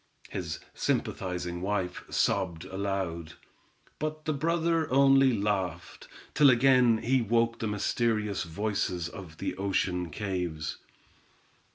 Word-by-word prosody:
His - - -4 0.2
sympathizing 90 -1 -2
wife 95 -2 -2
sobbed 85 -3 0
aloud, 95 -5 -3 0.7
but 155 +1 -4
the 155 - 0
brother 165 +1 0
only 135 0 +6
laughed, 100 -6 -2 0.3
till 145 -2 +6
again 125 -2 +5
he 130 +2 +3
woke 115 +1 +1
the 110 - -2
mysterious 105 -1 0
voices 90 -1 -2
of 85 -3 -10
the - - -3
ocean 90 -2 0
caves. 90 -4 -3
105 Hz, 105 wpm, -29 LUFS, 90-125 Hz, 0.7 s, only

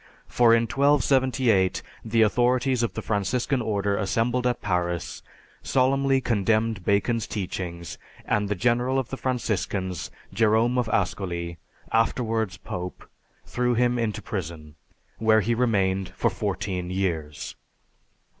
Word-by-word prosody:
For 115 -1 +4
in 115 - +3
1278 130 -6 +2 0.2
the 115 0 +3
authorities 125 +4 +2
of 115 - -1
the 110 - -4
Franciscan 120 +5 0
Order 100 -2 0
assembled 115 +4 0
at 125 - 0
Paris, 90 -3 -2 0.4
solemnly 135 +1 +2
condemned 110 -3 +1
Bacon's 105 +4 +1
teachings, 85 -5 -5 0.3
and 105 -1 0
the 105 - 0
general 120 +6 +1
of 130 -2 -2
the - - -2
Franciscans, 100 -8 -2 0.2
Jerome 115 +3 +3
of 120 -3 -1
Ascoli, 85 -4 -2 0.3
afterwards 115 -2 0
Pope, 90 0 -7 0.4
threw 125 0 0
him 120 +1 +2
into 110 -3 -2
prison, 80 -6 -5 0.5
where 110 -1 +4
he 115 +4 0
remained 95 -6 +1
for - - +1
fourteen 95 -3 -3
years. 85 -6 -3
110 Hz, 120 wpm, -25 LUFS, 95-125 Hz, 0.5 s, For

